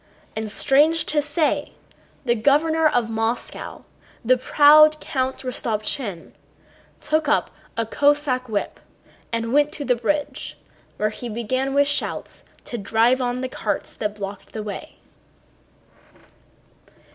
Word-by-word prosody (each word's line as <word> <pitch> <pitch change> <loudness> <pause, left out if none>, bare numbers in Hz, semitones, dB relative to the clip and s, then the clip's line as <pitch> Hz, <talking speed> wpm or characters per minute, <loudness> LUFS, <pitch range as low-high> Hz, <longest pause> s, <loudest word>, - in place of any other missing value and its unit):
And 220 0 -3
strange 295 +8 +3
to 300 -1 +1
say, 295 0 -1 0.5
the 240 - +3
Governor 310 +7 +3
of 245 -6 0
Moscow, 225 +2 -3 0.4
the 255 +3 +5
proud 305 +4 +6
Count 260 -1 -2
Rostopchín, 215 -5 -2 0.7
took 310 0 0
up - - +1 0.3
a 230 - 0
Cossack 285 0 +1
whip 205 -2 -3 0.5
and 230 +1 -2
went 295 +1 +3
to 290 - -4
the 250 - +3
bridge 285 +5 -2 0.4
where 215 0 0
he 235 +3 -7
began 255 +5 -2
with 285 0 +4
shouts 285 - -3 0.2
to 240 - -5
drive 225 +5 +2
on 245 0 -1
the 260 - -2
carts - - -3
that 210 -1 -3
blocked 200 -1 -8
the 215 - -4
way. 210 -1 -7
255 Hz, 125 wpm, -22 LUFS, 225-290 Hz, 0.7 s, proud